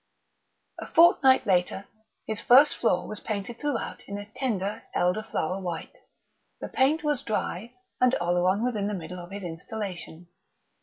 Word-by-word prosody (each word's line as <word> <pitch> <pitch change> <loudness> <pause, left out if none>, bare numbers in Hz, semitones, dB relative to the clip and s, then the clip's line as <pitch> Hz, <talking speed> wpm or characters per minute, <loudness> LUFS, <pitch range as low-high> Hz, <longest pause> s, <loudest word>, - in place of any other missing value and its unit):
A - - -6
fortnight 290 -6 +5
later 190 0 +1 0.4
his 220 -1 -3
first 270 +4 +6
floor 180 -6 +1
was 215 - -5
painted 215 +2 -5
throughout 290 -6 -3
in 200 - -5
a 205 - -7
tender, 210 -6 -2
elder 180 +4 +2
flower 190 -3 -3
white, 175 -3 -5 0.6
the - - -6
paint 295 +4 +2
was 295 -3 0
dry, 215 +1 -3 0.2
and 255 0 +4
Oleron 180 +4 +1
was 250 -1 0
in 200 -1 -1
the 210 - -2
middle 180 0 -7
of 175 0 -9
his 200 0 -7
installation. 175 -1 -6
205 Hz, 155 wpm, -27 LUFS, 180-245 Hz, 0.6 s, first